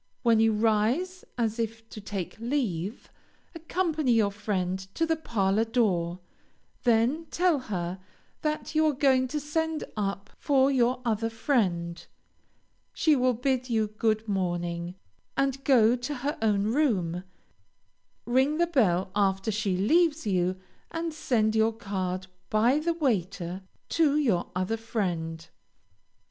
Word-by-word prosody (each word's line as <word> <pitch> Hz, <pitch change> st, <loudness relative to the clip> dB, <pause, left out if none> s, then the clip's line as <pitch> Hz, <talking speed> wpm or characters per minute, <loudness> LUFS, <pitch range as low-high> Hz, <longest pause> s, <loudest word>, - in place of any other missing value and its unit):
When 230 Hz, -2 st, +4 dB
you 225 Hz, 0 st, +4 dB
rise 230 Hz, -, +1 dB
as 225 Hz, -1 st, -1 dB
if 225 Hz, 0 st, -3 dB
to 215 Hz, -, -9 dB
take 195 Hz, -3 st, -5 dB
leave, 230 Hz, -, -2 dB, 0.4 s
accompany 320 Hz, -5 st, 0 dB
your 215 Hz, -3 st, +3 dB
friend 190 Hz, -3 st, -2 dB, 0.2 s
to 330 Hz, -, +1 dB
the 325 Hz, 0 st, +1 dB
parlor 215 Hz, -8 st, +1 dB
door, 185 Hz, -7 st, 0 dB, 0.6 s
then 240 Hz, +7 st, +2 dB
tell 350 Hz, -3 st, +2 dB
her 185 Hz, -6 st, -4 dB, 0.4 s
that 305 Hz, 0 st, -2 dB
you 315 Hz, 0 st, +3 dB
are 300 Hz, -, +2 dB
going 260 Hz, -1 st, +3 dB
to 300 Hz, +4 st, -2 dB
send 320 Hz, +2 st, -2 dB
up 200 Hz, -1 st, -3 dB
for 275 Hz, -1 st, +3 dB
your 250 Hz, -1 st, +1 dB
other 225 Hz, 0 st, 0 dB
friend. 185 Hz, -9 st, 0 dB, 0.9 s
She 310 Hz, -2 st, +3 dB
will 255 Hz, -2 st, +2 dB
bid 255 Hz, +1 st, -1 dB
you 220 Hz, -2 st, +1 dB
good 220 Hz, +1 st, 0 dB
morning, 175 Hz, -2 st, -2 dB, 0.4 s
and 275 Hz, 0 st, 0 dB
go 240 Hz, -4 st, +5 dB
to 250 Hz, +4 st, -4 dB
her 280 Hz, +4 st, -2 dB
own 210 Hz, -3 st, +2 dB
room; 185 Hz, -, +1 dB, 1.0 s
ring 260 Hz, +6 st, +2 dB
the 345 Hz, -, +3 dB
bell 195 Hz, -, +1 dB
after 195 Hz, +1 st, +1 dB
she 205 Hz, -3 st, -1 dB
leaves 315 Hz, -, +2 dB
you, 185 Hz, -2 st, 0 dB, 0.3 s
and 330 Hz, 0 st, -3 dB
send 220 Hz, -7 st, +1 dB
your 220 Hz, +1 st, +3 dB
card 190 Hz, -4 st, -3 dB, 0.2 s
by 235 Hz, +7 st, +3 dB
the 335 Hz, +2 st, 0 dB
waiter 190 Hz, -, -1 dB, 0.3 s
to 300 Hz, -3 st, +3 dB
your 225 Hz, -13 st, +1 dB
other 185 Hz, +5 st, -1 dB
friend. 170 Hz, -8 st, -3 dB
225 Hz, 135 wpm, -27 LUFS, 195-275 Hz, 1.0 s, go